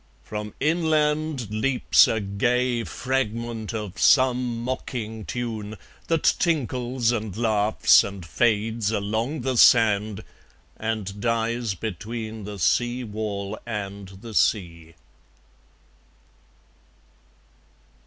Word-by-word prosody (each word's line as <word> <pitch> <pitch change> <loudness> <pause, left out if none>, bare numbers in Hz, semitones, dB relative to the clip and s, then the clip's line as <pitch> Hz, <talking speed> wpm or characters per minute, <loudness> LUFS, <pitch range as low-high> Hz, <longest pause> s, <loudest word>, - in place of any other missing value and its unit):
From 105 0 -6
inland 155 - +1
Leaps 125 +4 +4
a 110 - 0
gay 120 +4 0
fragment 115 -3 -3
of 105 -3 -5
some 125 -3 +3
mocking 115 -4 -4
tune, 110 -3 -4 0.3
That 165 -2 +1 0.2
tinkles 125 -6 0
and 110 -4 -3
laughs 110 -2 +4
and 100 -3 -7
fades 110 +4 +1
along 110 +8 -2
the 130 0 -1
sand, 110 -3 +4 0.5
And 105 -3 -4
dies 115 -1 0
between 110 +2 -5
the 105 0 -7
seawall 110 0 -1
and 100 -3 -5
the 100 +4 -11
sea. 85 -7 0
110 Hz, 90 wpm, -24 LUFS, 105-125 Hz, 0.5 s, Leaps